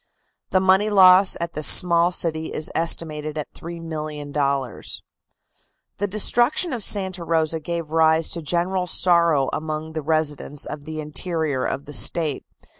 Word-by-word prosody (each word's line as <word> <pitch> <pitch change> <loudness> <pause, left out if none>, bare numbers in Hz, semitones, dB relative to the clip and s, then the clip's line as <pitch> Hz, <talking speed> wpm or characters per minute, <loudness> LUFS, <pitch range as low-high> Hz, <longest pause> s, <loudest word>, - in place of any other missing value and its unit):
The 185 - +2
money 190 +3 +3
loss 190 -1 +5
at 170 0 -4
this 155 0 +2
small 170 0 +4
city 160 -2 -2
is 155 - -3
estimated 155 -2 -2
at 150 - -6
$3,000,000. 150 - -4 1.0
The 205 - -1
destruction 240 - +2
of 235 -4 -3
Santa 190 -4 0
Rosa 160 -1 0
gave 165 0 -5
rise 160 0 +3
to 170 - -5
general 180 +4 -2
sorrow 170 -7 +3
among 155 0 -5
the 160 - -4
residents 150 -2 -1
of 145 -1 -8
the 155 0 -6
interior 155 -2 -3
of 140 - -3
the 145 - -9
State. 155 -1 +1
160 Hz, 140 wpm, -22 LUFS, 150-180 Hz, 1.0 s, loss